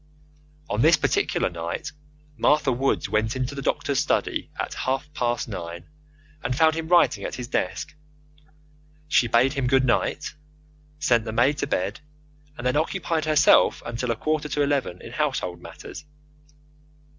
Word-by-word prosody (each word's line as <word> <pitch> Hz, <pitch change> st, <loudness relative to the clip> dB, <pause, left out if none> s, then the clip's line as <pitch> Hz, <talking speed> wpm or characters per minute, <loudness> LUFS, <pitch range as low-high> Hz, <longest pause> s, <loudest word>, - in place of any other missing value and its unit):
On 105 Hz, +2 st, -1 dB
this 160 Hz, +3 st, +6 dB
particular -, -, +1 dB
night 85 Hz, +9 st, -4 dB, 0.4 s
Martha 145 Hz, +3 st, +3 dB
Woods 130 Hz, +3 st, 0 dB
went 110 Hz, +2 st, 0 dB
into 130 Hz, +1 st, -2 dB
the 140 Hz, -, -5 dB
doctor's -, -, 0 dB
study -, -, 0 dB
at -, -, -3 dB
half 135 Hz, +3 st, -2 dB
past 120 Hz, -4 st, -1 dB
nine, 85 Hz, -5 st, -6 dB, 0.6 s
and 125 Hz, -, -1 dB
found 160 Hz, 0 st, +5 dB
him 160 Hz, 0 st, -4 dB
writing 175 Hz, 0 st, +4 dB
at -, -, -4 dB
his 125 Hz, -1 st, -6 dB
desk. 90 Hz, -7 st, -2 dB, 1.1 s
She 125 Hz, -5 st, +3 dB
bade 120 Hz, +4 st, +3 dB
him 135 Hz, -4 st, -1 dB
good 135 Hz, 0 st, +3 dB
night, 120 Hz, -, 0 dB, 0.6 s
sent 120 Hz, -7 st, +2 dB
the 110 Hz, -, -3 dB
maid 130 Hz, +6 st, +2 dB
to -, -, -1 dB
bed, 95 Hz, +3 st, -1 dB, 0.6 s
and 120 Hz, -, -7 dB
then 125 Hz, +3 st, +2 dB
occupied 165 Hz, 0 st, -1 dB
herself 155 Hz, -1 st, +4 dB
until 120 Hz, +1 st, -3 dB
a 115 Hz, -, +1 dB
quarter 155 Hz, +4 st, -1 dB
to 145 Hz, -, +1 dB
eleven 140 Hz, -11 st, -1 dB
in -, -, -9 dB
household 85 Hz, -1 st, -2 dB
matters. -, -, -10 dB
130 Hz, 155 wpm, -24 LUFS, 115-150 Hz, 1.1 s, this